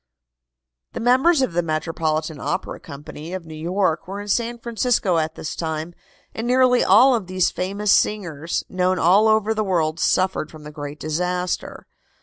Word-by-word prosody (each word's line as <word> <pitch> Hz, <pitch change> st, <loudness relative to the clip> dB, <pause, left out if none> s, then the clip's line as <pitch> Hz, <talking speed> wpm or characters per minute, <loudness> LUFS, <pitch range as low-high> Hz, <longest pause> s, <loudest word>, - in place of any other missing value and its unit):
The -, -, -4 dB
members 265 Hz, +6 st, +4 dB
of 220 Hz, -, -1 dB
the 175 Hz, -, +2 dB
Metropolitan 155 Hz, -1 st, -2 dB
Opera 185 Hz, -, -3 dB
Company, 150 Hz, +2 st, -9 dB
of 185 Hz, -3 st, -7 dB
New 160 Hz, -, -10 dB
York, 170 Hz, +2 st, -1 dB
were 195 Hz, +2 st, -5 dB
in 205 Hz, 0 st, -7 dB
San 235 Hz, +3 st, 0 dB
Francisco 230 Hz, -6 st, 0 dB
at 160 Hz, 0 st, -2 dB
this 155 Hz, -, -5 dB
time, 160 Hz, +1 st, -4 dB, 0.4 s
and 225 Hz, +2 st, -4 dB
nearly 250 Hz, 0 st, +4 dB
all 240 Hz, +8 st, +6 dB
of 220 Hz, -7 st, -1 dB
these 185 Hz, -1 st, +1 dB
famous 200 Hz, +3 st, -1 dB
singers, 170 Hz, -6 st, 0 dB
known 185 Hz, 0 st, 0 dB
all 190 Hz, +6 st, +4 dB
over 220 Hz, 0 st, +3 dB
the 215 Hz, 0 st, -1 dB
world, 165 Hz, -5 st, 0 dB
suffered 185 Hz, -2 st, +1 dB
from 155 Hz, -1 st, -13 dB
the 150 Hz, -, -9 dB
great 145 Hz, -1 st, -7 dB
disaster. 180 Hz, +3 st, -3 dB
180 Hz, 165 wpm, -22 LUFS, 160-215 Hz, 0.4 s, all